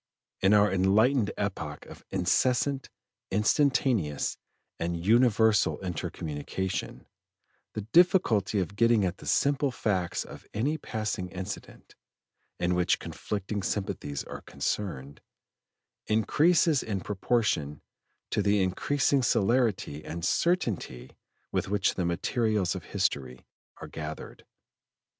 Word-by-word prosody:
In 95 +2 +5
our 105 -1 +4
enlightened 105 +5 +3
epoch 85 -8 -4
of - - -13
incessant, 125 +9 +1 0.4
instantaneous, 110 - +1 0.4
and 85 +1 -1
universal 110 -2 +4
inter 90 -4 -3
communication, 80 +5 -4 0.7
the 110 - -3
difficulty 115 - +3
of 95 +1 -2
getting 115 -2 +4
at 90 0 -2
the - - -10
simple 140 0 +2
facts 95 -8 -1
of - - -12
any 145 +9 0
passing 110 -7 -3
incident, 95 +3 -8 0.7
in 90 0 +1
which 90 0 +2
conflicting 100 0 -4
sympathies 85 -8 -3
are - - -8
concerned, 70 -9 -4 0.9
increases 150 - +3
in 100 -4 -3
proportion 95 -8 -1 0.5
to - - +1
the 100 -1 +3
increasing 135 +9 +1
celerity 115 - +1
and 85 +1 -5
certainty 115 - 0 0.4
with - - -1
which 100 -1 +1
the 90 - -2
materials 105 +2 0
of 95 -3 -7
history 70 -11 -2 0.3
are - - -8
gathered. 75 -1 -8
100 Hz, 110 wpm, -28 LUFS, 90-120 Hz, 0.9 s, In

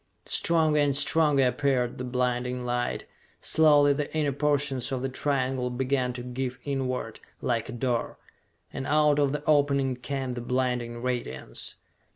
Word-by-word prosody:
Stronger 160 -3 +3
and 145 -2 +2
stronger 145 -2 +3
appeared 125 -1 0
the - - -3
blinding 125 0 -1
light. 120 0 -2 0.3
Slowly 145 -2 +5
the 145 +1 -3
inner 150 -2 +1
portion 140 -2 0
of 130 -2 -3
the 135 - -1
triangle 130 -2 -1
began 130 0 0
to 120 0 -6
give 125 0 -4
inward, 130 -5 -3 0.2
like 115 -2 -1
a - - -5
door. 120 -1 -2 0.6
And 135 - -4
out 150 0 +3
of 140 -2 +2
the 150 0 -3
opening 140 -3 +2
came 130 +1 -4
that 120 -1 -4
blinding 125 -2 -1
radiance. 90 - -4
130 Hz, 150 wpm, -27 LUFS, 125-145 Hz, 0.6 s, Slowly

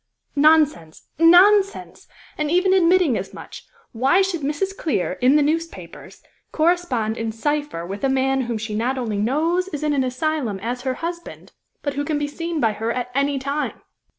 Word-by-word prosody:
"Nonsense! 295 - +2
nonsense! 385 +4 +4 0.3
And 300 -1 -2
even 365 +3 +3
admitting 350 - +3
as 190 - -8
much, - - -11 0.2
why 270 +11 +3
should 370 -4 -2
Mrs. 305 +8 -2
Clear, 300 - -1
in 255 +3 +4
the 300 - +4
newspapers, 330 +3 -5 0.3
correspond 310 -10 0
in 225 -1 -3
cypher 290 - -3
with 195 +6 -7
a 270 - +2
man 265 0 +1
whom 235 -1 -3
she 215 0 -5
not 240 +5 -1
only 225 -5 -3
knows 320 - 0
is 305 -5 -6
in 300 -1 +1
an 270 -2 +1
asylum 255 -4 -2
as 245 +2 -3
her 260 0 -2
husband, 340 0 -7 0.3
but 285 - -2
who 285 +1 -2
can 295 +1 -1
be 295 - -1
seen 330 +2 -4
by 225 -5 +1
her 225 +2 -3
at 250 0 -4
any 280 +1 0
time?" 280 +3 -3
285 Hz, 180 wpm, -21 LUFS, 245-330 Hz, 0.3 s, nonsense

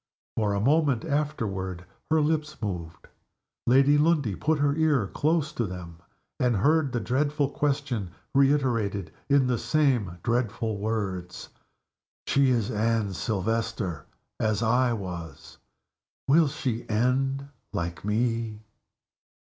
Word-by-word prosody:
For 105 -2 +1
a - - 0
moment 140 +1 +2
afterward 105 - -2 0.2
her 160 0 +4
lips 155 0 -1
moved. 85 -6 -5 0.6
Lady 135 +4 +5
Lundie 150 - +2
put 155 - +1
her 145 0 +2
ear 150 -8 +2
close 155 - 0
to 120 -7 -2
them, 85 -2 -8 0.4
and 125 -2 +2
heard 145 +6 +3
the 120 - -1
dreadful 145 +5 0
question 135 -10 -1 0.2
reiterated, 120 - +2 0.2
in 140 -1 +4
the 125 -2 0
same 125 - +1
dreadful 115 -3 -1
words: 95 -4 -3 0.8
"She 140 -1 +3
is 115 -4 +1
Anne 110 -2 0
Silvester 110 - -2 0.3
as 110 0 +1
I 120 +2 +3
was. 90 -7 -6 0.7
_Will 155 +2 +5
she 125 -5 -3
end 135 +5 +1 0.2
like 85 -2 -4
Me? 110 0 -1
120 Hz, 115 wpm, -27 LUFS, 100-140 Hz, 0.8 s, Lady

